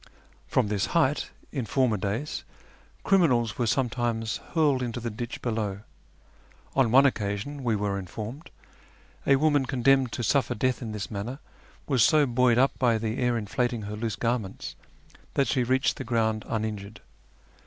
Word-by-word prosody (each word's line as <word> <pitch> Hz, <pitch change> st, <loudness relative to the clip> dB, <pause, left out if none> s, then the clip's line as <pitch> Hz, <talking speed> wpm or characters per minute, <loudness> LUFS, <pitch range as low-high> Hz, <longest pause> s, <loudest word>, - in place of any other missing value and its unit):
From -, -, +2 dB
this 105 Hz, +1 st, 0 dB
height, 150 Hz, -3 st, +2 dB, 0.2 s
in 130 Hz, -6 st, -3 dB
former 125 Hz, -1 st, +2 dB
days, 105 Hz, +9 st, -3 dB, 0.6 s
criminals 130 Hz, -, +3 dB
were 120 Hz, -, +1 dB
sometimes 115 Hz, -3 st, 0 dB, 0.2 s
hurled 145 Hz, -5 st, +3 dB
into 120 Hz, -1 st, -3 dB
the 115 Hz, 0 st, -4 dB
ditch 120 Hz, +2 st, -6 dB
below. 105 Hz, -4 st, -2 dB, 0.9 s
On 135 Hz, -4 st, +4 dB
one 135 Hz, +4 st, +6 dB
occasion, 115 Hz, +3 st, -1 dB
we 115 Hz, -3 st, +1 dB
were 100 Hz, -1 st, -1 dB
informed, 110 Hz, -, -7 dB, 0.8 s
a 140 Hz, -, +6 dB
woman 145 Hz, -2 st, +2 dB
con 125 Hz, -3 st, -3 dB
demned 135 Hz, -2 st, +4 dB
to 120 Hz, -, -3 dB
suffer 135 Hz, +5 st, +1 dB
death 130 Hz, +4 st, 0 dB
in 115 Hz, -3 st, -5 dB
this 105 Hz, 0 st, -5 dB
manner 110 Hz, +6 st, -4 dB, 0.5 s
was 130 Hz, -6 st, +3 dB
so 150 Hz, +4 st, +5 dB
buoyed 125 Hz, -1 st, +3 dB
up 135 Hz, +2 st, +2 dB
by 120 Hz, -3 st, +3 dB
the 110 Hz, +2 st, -3 dB
air 125 Hz, -2 st, +1 dB
inflating 115 Hz, +1 st, -1 dB
her 105 Hz, +1 st, -5 dB
loose 110 Hz, -1 st, -2 dB
garments 115 Hz, -5 st, -3 dB, 0.6 s
that 140 Hz, -, +2 dB
she 130 Hz, -, +1 dB
reached 130 Hz, +2 st, +1 dB
the -, -, -4 dB
ground 110 Hz, -2 st, 0 dB
uninjured. 110 Hz, -1 st, -4 dB
120 Hz, 160 wpm, -27 LUFS, 110-130 Hz, 0.9 s, one